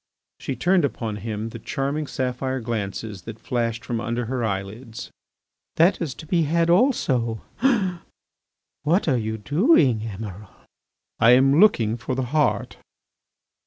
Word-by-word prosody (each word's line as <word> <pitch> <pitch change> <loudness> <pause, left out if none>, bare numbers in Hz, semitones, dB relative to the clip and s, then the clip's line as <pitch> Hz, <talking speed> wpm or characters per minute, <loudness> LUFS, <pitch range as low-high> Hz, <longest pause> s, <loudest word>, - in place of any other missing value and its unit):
She 135 - -4
turned 175 +7 +2
upon 115 -6 -2
him 110 +1 -4
the 115 - -8
charming 140 +5 -2
sapphire 130 0 -2
glances 110 -3 -4
that 115 - -7
flashed 115 -2 -2
from 115 -2 -2
under 120 +1 -2
her 125 +1 -2
eyelids. 110 +3 -5 0.6
"That 170 +4 +3
is 150 -7 -3
to - - -10
be 170 +2 +1
had 165 +2 +2
also... 135 - +2 1.4
what 170 +6 +1
are 135 - +3
you 110 -1 -3
doing, 145 - +3
Emiral?" 105 -2 -7 0.7
"I 115 +1 +7
am 135 +4 +5
looking 120 - +4
for 120 +2 -4
the 130 - -1
heart." 125 -6 +1
120 Hz, 135 wpm, -23 LUFS, 110-145 Hz, 1.4 s, I